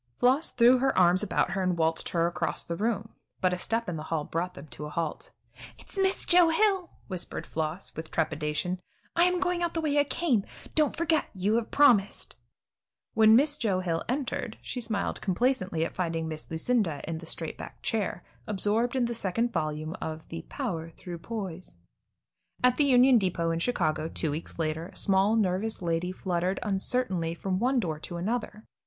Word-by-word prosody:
Floss 265 +6 +3
threw 245 +2 +5
her 270 +1 +1
arms 180 0 +5
about 210 -3 +1
her 190 +1 -1
and 180 -2 +1
waltzed 160 0 0
her 170 -1 +1
across 170 - -2
the 170 - -3
room, 220 +2 -1 0.3
but 185 -1 +2
a - - -1
step 230 +4 -1
in 175 -3 -3
the 155 - -6
hall 160 -2 0
brought 170 +4 -3
them 140 - -9
to 150 - -6
a - - -7
halt. 165 0 -3 0.5
"It's - - -13
Miss 385 -1 +1
Joe 350 -2 +6
Hill," 380 +1 +2 0.2
whispered 185 -3 -4
Floss, 160 +4 -3
with 160 0 -6
trepidation; 155 +3 -1 0.4
"I 340 +1 +5
am 360 0 +2
going 360 -1 0
out 340 -1 -1
the - - +1
way 295 -2 +2
I - - +6
came. 275 - +1 0.3
Don't 305 -2 +2
you - - -18
forget; 325 -2 +1
you 195 +3 +1
have 235 - -2
promised." 240 -9 +3 0.8
When 220 0 +7
Miss 290 +4 +4
Joe 195 -7 +1
Hill 165 -3 -1
entered, 250 -3 -2
she 250 - -4
smiled 220 -3 -2
complacently 185 -5 +1
at - - -5
finding 165 -3 -2
Miss 155 -1 -6
Lucinda 165 -2 0
in 160 0 -3
the 165 - -10
straight 165 -1 -4
back - - -9
chair, 205 -5 -1 0.2
absorbed 215 +4 +1
in 255 -2 +2
the 235 - -2
second 230 +2 -1
volume 155 +2 -2
of 160 0 -5
the 165 0 -5
"Power 175 - -3
Through 170 +1 -8
Poise." 185 - -6 0.9
At 250 0 +4
the 295 - +4
Union 255 -2 +6
Depot 170 -4 0
in 165 - -1
Chicago, 160 -7 0
two 160 -1 -2
weeks 155 +3 -6
later, 160 0 -2
a - - -16
small, 195 +2 +3
nervous 210 +1 0
lady 170 0 -1
fluttered 185 0 -1
uncertainly 190 -4 -1
from 185 +1 -2
one 255 +3 +2
door 160 -8 -2
to 175 - -6
another. 215 +3 -3
190 Hz, 190 wpm, -28 LUFS, 165-245 Hz, 0.9 s, When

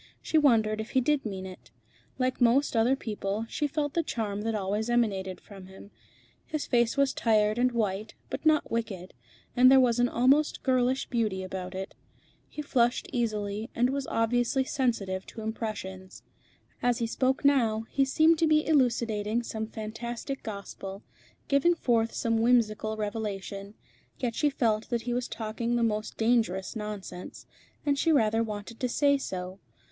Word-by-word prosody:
She 315 - +2
wondered 220 -6 +3
if 220 - -8
he - - +7
did 275 -1 +1
mean 190 -2 -5
it. 185 -1 -11 0.5
Like 255 -1 -1
most 245 +3 +3
other 230 +4 +4
people, 210 -3 -3
she 295 +5 -1
felt 290 0 -2
the 335 - +2
charm 210 -9 -3
that 225 +1 -1
always 210 +3 -1
emanated 195 -6 0
from 195 -2 -13
him. 190 +2 -13 0.6
His 310 -2 -3
face 235 0 +2
was 275 -1 +3
tired 215 -1 +2
and 250 +1 +3
white, 215 -2 -2 0.2
but - - -4
not 310 -1 +3
wicked, 200 -6 -3 0.4
and 255 +1 +7
there 265 0 +7
was 245 -2 +3
an 245 0 +3
almost 275 +5 +2
girlish 255 0 +2
beauty 215 -6 -1
about 185 0 -6
it. 190 +1 -5 0.6
He 300 - -6
flushed 245 -3 +1
easily, 215 -3 -2
and 245 +2 +2
was 275 -1 -3
obviously 245 +3 +1
sensitive 220 -9 -1
to 225 - -9
impressions. 210 -4 -6 0.6
As 245 -1 +2
he 235 - -1
spoke 260 +4 0
now, 225 -6 +3
he 275 - +3
seemed 315 +4 +4
to 325 - +3
be 305 0 +3
elucidating 235 -6 +1
some 220 -1 -4
fantastic 235 +5 -5
gospel, 200 -1 -7 0.4
giving 285 +5 +3
forth 230 -6 +1
some 230 -1 0
whimsical 220 -2 +2
revelation; 205 -1 -4 0.4
yet 240 -3 -2
she 295 +5 +2
felt 225 -6 0
that 235 -2 -1
he 245 - -2
was 245 0 -1
talking 230 +2 -3
the 235 - +1
most 215 -1 -1
dangerous 220 -4 +1
nonsense, 210 -4 -7 0.4
and 285 -1 +1
she 325 - +3
rather 225 -6 +3
wanted 215 0 -5
to 250 - -1
say 280 +3 +3
so. 185 -4 -5
230 Hz, 165 wpm, -28 LUFS, 210-255 Hz, 0.6 s, he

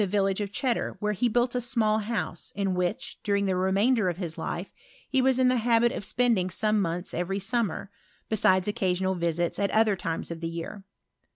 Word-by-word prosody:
23T 205 - +2
levillagB 195 0 +1
of 205 -1 -3
Cheddar, 240 -2 -1
wheorehe 210 +3 0
built 240 +2 +2
a 250 - 0
small 225 -3 +1 0.6
in 195 -2 0
whidi, 180 +3 -2
during 200 -1 +1
the 190 -1 +1
remainder 195 +3 +2
of 175 - -4
his 170 -4 -4
life, - - -4 0.4
he 265 - +1
L 260 +1 +4
the 255 0 +3
habit 235 0 +3
cft - - -5
spending 230 -7 +1
some 215 +3 +1
months 175 0 -2
every 180 +3 -1
a*y. 220 -1 0 0.4
besides 190 -3 +3
occasional 190 -3 0
visita 170 -1 -1
at 200 - +2
other 215 -2 +3
times* 170 -3 -4
of 165 0 -7
ar. 170 +5 -5
200 Hz, 180 wpm, -27 LUFS, 185-230 Hz, 0.6 s, L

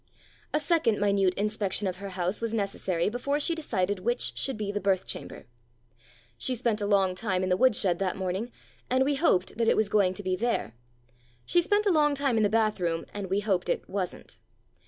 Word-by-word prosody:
A 300 - +1
second 295 -8 +2
minute 200 -2 +2
inspection 210 -1 -1
of 185 -1 -3
her 200 +1 -6
house 185 +2 -2
was 230 -1 -2
necessary 195 -4 -1
before 260 +6 -1
she 320 +3 +1
decided 205 - -1
which 240 +6 -1
should 270 -4 -2
be 210 -2 -3
the 205 0 -3
birth 190 -2 +1
chamber. - - -7 0.9
She 255 - -1
spent 230 -3 -1
a 205 - -1
long 195 -2 +3
time 185 -1 -1
in 185 - -1
the 180 - +3
wood 255 +2 +4
shed 180 -4 +1
that 190 -2 -1
morning, 190 +5 -3 0.4
and 260 +1 +3
we 290 - +2
hoped 270 - +1
that 230 - +2
it - - +4
was 215 -2 +2
going 195 -3 +2
to 205 - -6
be 185 -1 0
there; 230 - -1 0.7
she 350 - +3
spent 410 +4 +1
a 400 - +4
long 295 -3 +3
time 275 -3 +1
in 220 - +2
the 205 - +3
bath 215 -1 +1
room, 165 -2 -1
and 200 -2 -5
we 195 +2 +1
hoped 195 -4 0
it - - -1
wasn't. 185 -2 -5
205 Hz, 215 wpm, -28 LUFS, 185-245 Hz, 0.9 s, wood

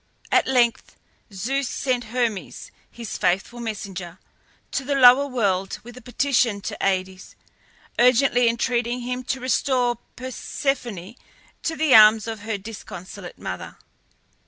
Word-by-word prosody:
At - - +3
length 245 -3 +1 0.4
Zeus 250 +8 -2
sent 250 -3 -1
Hermes, 230 -3 -3 0.2
his 235 -3 -7
faithful 195 +7 0
messenger, 195 -6 -6 0.5
to 275 - -2
the 280 +1 -1
lower 265 +1 +7
world 195 -7 -1
with 240 +1 -11
a 255 - -11
petition 245 -3 +1
to - - -5
Aïdes, 185 -1 -2 0.6
urgently 245 0 +4
entreating 240 +1 -1
him 250 +1 -4
to 265 - -2
restore 250 -1 +1 0.2
Persephone 250 - -4 0.5
to 320 - -2
the 310 -4 +2
arms 215 -1 +8
of 225 -1 -5
her 215 0 -3
disconsolate 195 -3 -9
mother. - - -7
240 Hz, 125 wpm, -23 LUFS, 205-255 Hz, 0.6 s, arms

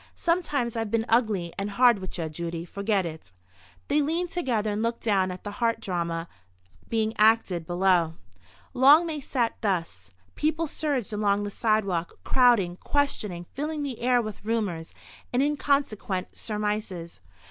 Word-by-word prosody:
Sometimes 295 -9 0
I've 225 -2 -2
been 225 +1 0
ugly 215 -7 +1
and 200 +1 -2
hard 240 +1 +4
with 185 0 -6
ye, 165 -2 -2
Judy. 170 +1 -5
Forget 200 +1 0
it." 160 - -8 0.6
They 295 +1 +3
leaned 335 +4 -1
together, 235 -11 0
and 205 +1 -2
looked 230 +1 -1
down 195 -4 +2
at 180 0 -7
the 205 - -5
heart 230 -1 +2
drama 170 -4 -2 0.6
being 220 -1 0
acted 210 -6 +3
below. 175 -2 +2 0.6
Long 280 +6 +7
they 315 -3 -3
sat 250 -4 -2
thus. 165 - -2 0.2
People 315 +2 0
surged 280 -8 -2
along 205 -1 +1
the 205 - -4
sidewalk, 200 -7 0
crowding, 230 -9 +3
questioning, 210 -12 -1
filling 300 +1 -3
the 270 -5 -4
air 245 0 +3
with 215 -2 -7
rumours, 205 -7 -2 0.4
and 250 +2 +2
inconsequent 280 -9 0
surmises. 210 -5 -4
Mrs. 80 - -29
215 Hz, 150 wpm, -26 LUFS, 185-250 Hz, 0.6 s, Long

